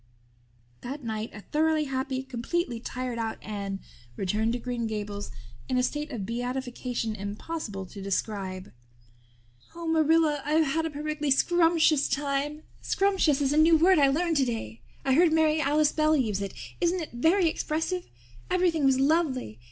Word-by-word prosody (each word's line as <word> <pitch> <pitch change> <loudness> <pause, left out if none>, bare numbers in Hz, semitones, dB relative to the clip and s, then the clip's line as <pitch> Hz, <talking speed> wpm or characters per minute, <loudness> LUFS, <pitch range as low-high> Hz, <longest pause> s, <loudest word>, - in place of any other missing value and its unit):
That 275 +3 -6
night 220 -1 -3
a 210 - -10
thoroughly 310 +5 +1
happy, 265 -1 -2
completely 260 +1 -2
tired 250 0 -4
out 225 -1 -2
Anne 200 -2 -4 0.4
returned 215 - 0
to - - -1
Green 240 -1 -3
Gables 205 -2 -4 0.4
in 255 - +1
a 250 - +2
state 295 +3 -2
of 230 -9 -4
beatification 245 -1 -3
impossible 205 +1 -5
to 195 +2 -10
describe. 195 -1 -3 1.0
"Oh, 340 0 -6
Marilla, 320 -2 +3
I've 310 +2 +2
had 320 +3 0
a - - -4
perfectly 300 0 -3
scrumptious 330 0 +4
time. 290 +2 -1 0.2
Scrumptious 380 -8 +2
is 280 0 +2
a - - +1
new 320 +1 +6
word 360 +2 +5
I 280 - +6
learned 325 +3 +1
today. 225 - -2 0.2
I 265 - +3
heard 335 +3 +5
Mary 315 -1 +3
Alice 295 +1 +3
Bell 310 0 +3
use 215 -7 0
it. 200 -1 -5 0.3
Isn't 350 +1 +1
it - - -9
very 330 +9 +3
expressive? 325 +3 -2 0.4
Everything 350 -4 +2
was 265 -1 +4
lovely. 270 - +1
275 Hz, 155 wpm, -27 LUFS, 230-315 Hz, 1.0 s, new